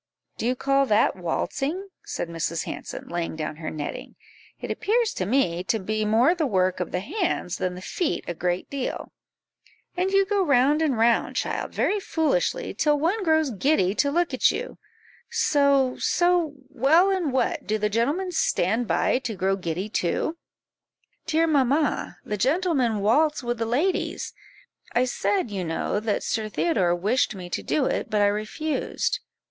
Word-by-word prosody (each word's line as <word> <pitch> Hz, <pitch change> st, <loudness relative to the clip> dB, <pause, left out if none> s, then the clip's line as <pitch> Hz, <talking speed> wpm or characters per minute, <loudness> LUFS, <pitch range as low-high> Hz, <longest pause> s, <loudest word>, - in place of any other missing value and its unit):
"Do 230 Hz, -, -1 dB
you 250 Hz, -, +1 dB
call 275 Hz, +1 st, +2 dB
that 215 Hz, 0 st, +3 dB
waltzing?" 275 Hz, -, -2 dB
said -, -, -4 dB
Mrs. 165 Hz, 0 st, -2 dB
Hanson, -, -, -7 dB
laying 170 Hz, -2 st, -3 dB
down 155 Hz, -1 st, -4 dB
her 155 Hz, -, -5 dB
netting; 150 Hz, -2 st, -6 dB, 0.4 s
"it -, -, -5 dB
appears 455 Hz, +1 st, +1 dB
to 185 Hz, -, -3 dB
me 180 Hz, -8 st, +1 dB
to 225 Hz, -, +1 dB
be 215 Hz, +2 st, -2 dB
more 230 Hz, +9 st, +4 dB
the 330 Hz, -5 st, 0 dB
work 185 Hz, -5 st, +1 dB
of 180 Hz, -, -3 dB
the 180 Hz, -, -1 dB
hands 345 Hz, -, -2 dB
than 185 Hz, -1 st, -2 dB
the 180 Hz, -, -9 dB
feet 345 Hz, -, -2 dB
a 175 Hz, -, -2 dB
great 175 Hz, +2 st, -2 dB
deal; 275 Hz, -3 st, -4 dB, 0.8 s
and 365 Hz, +1 st, +1 dB
you 390 Hz, 0 st, +3 dB
go 405 Hz, 0 st, +1 dB
round 285 Hz, 0 st, +3 dB
and 290 Hz, -7 st, +1 dB
round, 230 Hz, +1 st, +2 dB
child, -, -, -2 dB
very 415 Hz, -, +1 dB
foolishly, 475 Hz, +8 st, 0 dB
till 300 Hz, -1 st, +2 dB
one 380 Hz, +8 st, 0 dB
grows 315 Hz, -4 st, +2 dB
giddy 200 Hz, -4 st, +2 dB
to 285 Hz, +6 st, +1 dB
look 345 Hz, +4 st, 0 dB
at -, -, +4 dB
you -, -, -6 dB, 0.5 s
so, 280 Hz, -3 st, +3 dB
so 350 Hz, -3 st, +2 dB, 0.2 s
well, 295 Hz, +8 st, +4 dB
and 360 Hz, -7 st, 0 dB
what, 255 Hz, -2 st, -1 dB
do 215 Hz, -, +1 dB
the 210 Hz, 0 st, 0 dB
gentlemen 285 Hz, -, 0 dB
stand 230 Hz, -, +1 dB
by 250 Hz, -, +2 dB
to 245 Hz, -4 st, -4 dB
grow 195 Hz, 0 st, +1 dB
giddy 180 Hz, +1 st, -3 dB
too?" 215 Hz, -, -1 dB, 0.9 s
"Dear 325 Hz, 0 st, +3 dB
mamma, 290 Hz, -1 st, +1 dB
the 210 Hz, -, -3 dB
gentlemen 265 Hz, -, +1 dB
waltz 295 Hz, +8 st, +2 dB
with 240 Hz, -1 st, -2 dB
the 225 Hz, -, -1 dB
ladies; 300 Hz, +11 st, -1 dB, 0.6 s
I 245 Hz, +1 st, +3 dB
said, 255 Hz, -, -1 dB
you 195 Hz, -2 st, -3 dB
know, 165 Hz, +4 st, -1 dB
that 215 Hz, -1 st, -1 dB
Sir 215 Hz, -1 st, -2 dB
Theodore 195 Hz, -, +1 dB
wished 215 Hz, +5 st, +1 dB
me 180 Hz, -2 st, -8 dB
to -, -, -2 dB
do 285 Hz, -, 0 dB
it, -, -, -1 dB
but 210 Hz, -2 st, +1 dB
I -, -, +5 dB
refused." 215 Hz, +10 st, -1 dB
255 Hz, 170 wpm, -25 LUFS, 200-320 Hz, 0.9 s, I